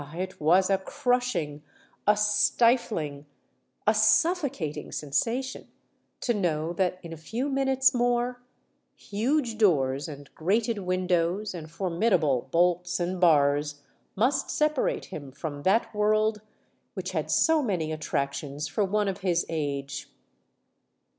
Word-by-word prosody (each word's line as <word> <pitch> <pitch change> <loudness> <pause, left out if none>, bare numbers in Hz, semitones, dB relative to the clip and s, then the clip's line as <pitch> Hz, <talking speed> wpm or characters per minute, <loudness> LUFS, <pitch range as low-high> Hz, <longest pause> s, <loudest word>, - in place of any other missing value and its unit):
it 185 0 -5
was 185 +5 +4
a 195 - +3
crushing—a 200 - -2
stifling—a 210 - 0
suffocating 215 - +1
sensation 235 - -2 0.5
to 240 - 0
know 170 -5 -1
that 180 0 0
in 165 -1 -7
a - - -6
few 225 - -4
minutes 270 -1 +2
more 245 0 0 0.5
huge 230 +2 -1
doors, 140 -9 +2
and 145 -2 -10
grated 215 +6 0
windows, 185 +1 0
and 160 -3 -8
formidable 170 - +1
bolts 175 +2 +1
and 180 +1 -2
bars 145 -3 +3 0.3
must 265 +7 +1
separate 305 -2 0
him 145 -7 -8
from 145 +1 -6
that 200 +9 +2
world 215 0 +1 0.5
which - - -4
had - - -2
so 320 -2 +3
many 180 - -1
attractions 145 -1 -3
for 210 - 0
one 205 +1 0
of 195 0 -2
his 175 -3 0
age! 140 -3 -3
185 Hz, 115 wpm, -27 LUFS, 155-225 Hz, 0.5 s, was